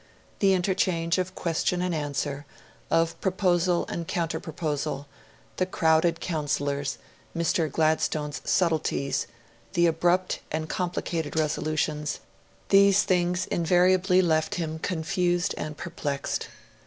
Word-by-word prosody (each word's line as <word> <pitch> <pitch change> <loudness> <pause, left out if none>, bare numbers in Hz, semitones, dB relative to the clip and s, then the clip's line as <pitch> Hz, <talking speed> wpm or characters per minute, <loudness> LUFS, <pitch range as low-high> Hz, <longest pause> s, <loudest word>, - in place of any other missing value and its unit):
The 195 -1 +4
interchange 180 -2 +1
of 185 0 -3
question 175 +1 0
and 180 0 -1
answer, 145 -1 -3 0.4
of 165 0 +1
proposal 180 -2 +2
and 170 -1 -4
counterproposal, 155 -4 -2 0.5
the 185 - +2
crowded 165 -1 +2
counsellors, 145 -3 -2 0.4
Mr. 165 -2 +1
Gladstone's 155 -1 0
subtleties, 160 -5 0 0.5
the 175 - +4
abrupt 175 +3 +2
and 155 0 -2
complicated 170 -3 -2
resolutions 155 -1 -1 0.5
these 200 0 +6
things 180 0 +1
invariably 180 +2 +3
left 160 +2 +1
him 160 -3 -3
confused 175 +1 0
and 150 -1 -5
perplexed. 140 -2 -3
165 Hz, 105 wpm, -26 LUFS, 155-180 Hz, 0.5 s, these